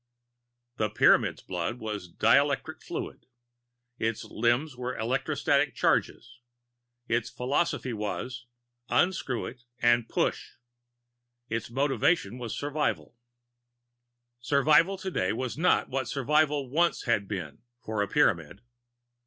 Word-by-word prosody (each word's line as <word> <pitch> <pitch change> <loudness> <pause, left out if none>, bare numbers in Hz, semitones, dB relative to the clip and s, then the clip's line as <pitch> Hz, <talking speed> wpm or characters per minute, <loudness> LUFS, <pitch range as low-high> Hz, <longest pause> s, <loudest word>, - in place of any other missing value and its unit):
The 110 - 0
Pyramid's 105 - +3
blood 90 +6 -3
was 105 -6 -6
dielectric 140 +8 +2
fluid. - - -6 0.7
Its 115 0 -1
limbs 120 +6 0
were 125 +1 -4
electrostatic 120 +5 +1
charges. 120 0 0 0.7
Its 115 0 0
philosophy 130 0 -1
was: 120 +3 -4 0.4
Unscrew 175 -9 +1
It 125 0 -9 0.2
and 120 -1 +3
Push. - - -1 1.0
Its 115 -1 -3
motive 135 +3 -1 0.4
was 120 -3 -5
survival. 145 -3 -2 1.2
Survival 150 +9 +3
today 185 - -1
was 125 +2 -3
not 180 +4 +2
what 130 -1 -2
survival 145 +2 +1
once 170 +7 +1
had 110 -5 +1
been, 90 -8 -6 0.2
for 110 -1 -2
a 100 - 0
Pyramid. 95 - +1
125 Hz, 105 wpm, -28 LUFS, 110-140 Hz, 1.2 s, Pyramid's